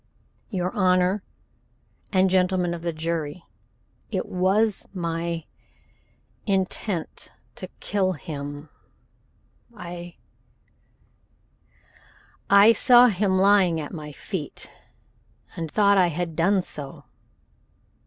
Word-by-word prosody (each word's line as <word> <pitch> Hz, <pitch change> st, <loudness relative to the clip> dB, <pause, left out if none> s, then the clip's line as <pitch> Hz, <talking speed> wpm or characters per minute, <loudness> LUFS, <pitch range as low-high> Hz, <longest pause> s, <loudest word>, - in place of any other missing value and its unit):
"Your 180 Hz, -4 st, -2 dB
Honor 185 Hz, 0 st, +2 dB, 0.9 s
and 190 Hz, -1 st, +4 dB
Gentlemen 180 Hz, -1 st, +1 dB
of 170 Hz, -, -6 dB
the 170 Hz, 0 st, -2 dB
Jury, 160 Hz, 0 st, -3 dB, 0.7 s
it -, -, -2 dB
was 195 Hz, +4 st, +1 dB
my 170 Hz, -1 st, -3 dB, 1.0 s
intent 190 Hz, -2 st, -2 dB, 0.2 s
to -, -, -8 dB
kill 190 Hz, -2 st, 0 dB
him. 145 Hz, -1 st, -7 dB, 1.1 s
I 175 Hz, -1 st, -8 dB, 2.3 s
I 200 Hz, +3 st, +7 dB
saw 245 Hz, +1 st, +7 dB
him 190 Hz, -1 st, +1 dB
lying 190 Hz, -4 st, +4 dB
at 150 Hz, +2 st, -6 dB
my 150 Hz, -3 st, -7 dB
feet 155 Hz, +1 st, -6 dB, 0.8 s
and 165 Hz, -1 st, -4 dB
thought 200 Hz, +2 st, +4 dB
I 180 Hz, -, +5 dB
had 170 Hz, 0 st, -3 dB
done 185 Hz, +3 st, +2 dB
so." 140 Hz, -5 st, -6 dB
180 Hz, 95 wpm, -24 LUFS, 165-195 Hz, 2.3 s, I